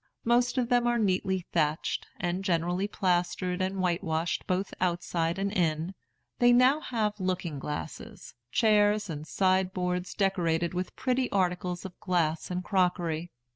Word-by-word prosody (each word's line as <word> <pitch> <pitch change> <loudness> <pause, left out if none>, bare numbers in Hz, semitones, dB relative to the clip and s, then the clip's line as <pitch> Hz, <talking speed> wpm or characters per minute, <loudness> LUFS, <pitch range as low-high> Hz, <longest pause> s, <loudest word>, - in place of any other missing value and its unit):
Most 240 +2 +2
of 250 -2 +2
them 245 -1 +3
are 240 0 +2
neatly 190 -3 0
thatched, 155 -2 0
and 180 +2 -2
generally 175 +1 0
plastered 180 -1 0
and 190 +1 -1
whitewashed 170 -2 -1
both 185 +1 -1
outside 170 -1 0
and 195 +1 -1
in. 165 -1 0 0.5
They 245 0 +6
now 255 +4 +5
have 215 -7 -2
looking 180 -5 -2
glasses, 200 +10 -7 0.2
chairs, 210 -3 +3
and 150 0 -6
side 185 0 +2
boards 180 0 -2
decorated 175 -4 +1
with 180 0 -3
pretty 255 0 0
articles 180 -2 -1
of 185 - -9
glass 165 -4 0
and 180 0 -2
crockery. 175 -3 0
185 Hz, 140 wpm, -29 LUFS, 175-205 Hz, 0.5 s, They